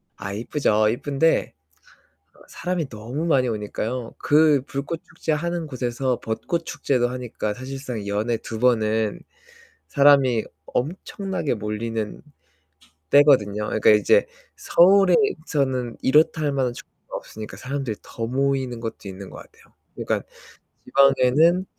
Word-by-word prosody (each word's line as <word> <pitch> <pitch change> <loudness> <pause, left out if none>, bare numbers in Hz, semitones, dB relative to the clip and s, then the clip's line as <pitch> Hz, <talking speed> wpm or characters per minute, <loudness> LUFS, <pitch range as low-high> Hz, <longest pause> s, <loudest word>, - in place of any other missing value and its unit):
아 95 0 -6
이쁘죠. 110 -1 +1
이쁜데 145 +6 +1 1.0
사람이 175 -4 -3
너무 120 +8 -5
많이 130 -6 +2
오니까요. 115 +3 -4
그 150 -2 +4
불꽃축제 155 +3 -4
하는 170 +1 -2
곳에서 125 -1 -2
벚꽃 115 +9 -3
축제도 125 -3 0
하니까 120 -4 -4
사실상 130 -4 -6
연에 105 +3 -1
2 110 - -7
번은 110 -3 +1 0.7
사람이 140 -5 +4 0.2
엄청나게 180 +1 -3
몰리는 105 0 -4 0.9
때거든요. 105 -8 +4
그니까 110 - +3
이제 290 - +4 0.3
서울에서는 170 - +3
이렇다 155 +3 +3
할만한 135 -4 0
축제가 - - -11
없으니까 110 0 -9
사람들이 135 -5 -4
더 115 -1 -5
모이는 130 -1 -1
것도 115 -3 -6
있는 95 0 -9
것 - - -11
같아요. - - -17 0.2
그니까 - - -2 0.6
지방에는 140 +6 +4
130 Hz, 285 characters per minute, -23 LUFS, 110-150 Hz, 1.0 s, 그